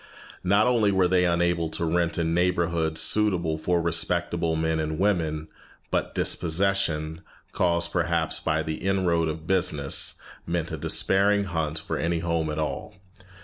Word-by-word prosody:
Not 100 +4 +3
only 115 -5 +3
were 95 -2 +3
they 90 0 +3
unable 85 -1 +1
to 85 - -2
rent 85 +1 0
in 85 -1 0
neighborhoods 85 -2 +1
suitable 90 -7 +1
for 90 +2 +1
respectable 85 0 +1
men 80 0 0
and 80 0 -2
women, 80 -6 0 0.4
but - - -1
dispossession, 85 -3 0 0.3
caused 85 -1 0
perhaps 85 -2 0
by 80 -1 0
the 80 0 -4
inroad 90 -4 +1
of 80 0 -5
business, 80 -7 0 0.3
meant 85 0 -2
a 80 - -3
despairing 100 +6 +2
hunt 80 -4 -2
for 80 - -4
any 85 +1 0
home 85 -1 -1
at 75 - -4
all. 80 -1 -4
85 Hz, 145 wpm, -25 LUFS, 80-90 Hz, 0.4 s, Not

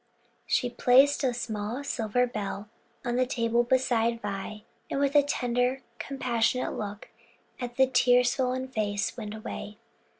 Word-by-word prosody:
She 250 - +2
placed 265 +4 +4
a 260 - +3
small 235 +1 -4
silver 245 -3 0
bell 210 -3 -5 0.4
on 240 0 0
the 255 0 +2
table 235 -1 +1
beside 235 -2 +1
Vi, 210 +1 -5 0.3
and - - -1
with 280 0 +2
a 290 - +8
tender, 250 -1 0 0.2
compassionate 250 -2 0
look 205 0 -6 0.5
at 245 -1 -5
the 265 +1 +5
tear 250 -1 +4
swollen 255 +1 0
face, 205 -5 -1
went 215 -3 -6
away. 210 -1 -7
245 Hz, 140 wpm, -28 LUFS, 215-255 Hz, 0.5 s, a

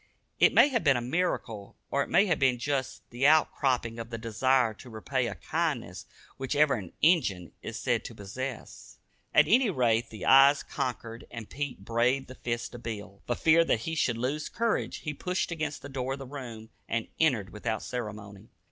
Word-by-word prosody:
It - - +6
may 290 - +6
have 240 -5 0
been 140 -3 +4
a - - 0
miracle, 120 - -2 0.2
or 140 - +2
it - - -3
may 200 - +5
have 175 -6 +1
been 130 -2 +3
just 135 +1 -3
the 125 +4 +2
out 155 +1 +5
cropping 120 -4 -1
of 115 0 -6
the 115 - -5
desire 115 +1 +1
to 125 +4 -13
repay 120 +3 -2
a 105 - -5
kindness 140 - -3 0.3
which 135 +2 -3
even 145 -4 +3
an 95 -4 -10
"Injun" 105 - +3
is - - -6
said - - 0
to - - -8
possess. 120 +5 -7 0.3
At 150 - +5
any 240 +1 +4
rate 120 - +1
the 110 - -7
eyes 135 +1 +7
conquered 115 -2 -5
and 115 -3 -9
Pete 135 -8 -5
braved 120 +4 +1
the - - -8
fist 120 -2 -4
of 120 - -9
Bill. 105 -4 -7
For 120 - 0
fear 165 +4 +5
that 115 - +1
he 160 - -4
should 120 -7 +1
lose 135 +6 -2
courage, 230 -1 -1
he 150 - -4
pushed 180 +4 -2
against 155 -3 -4
the - - -6
door 135 -1 -3
of - - -5
the 135 - -8
room, 120 -5 -8 0.2
and 115 -1 -1
entered 120 -12 +2
without 110 +1 -3
ceremony. 105 -3 -7
125 Hz, 200 wpm, -29 LUFS, 115-145 Hz, 0.3 s, eyes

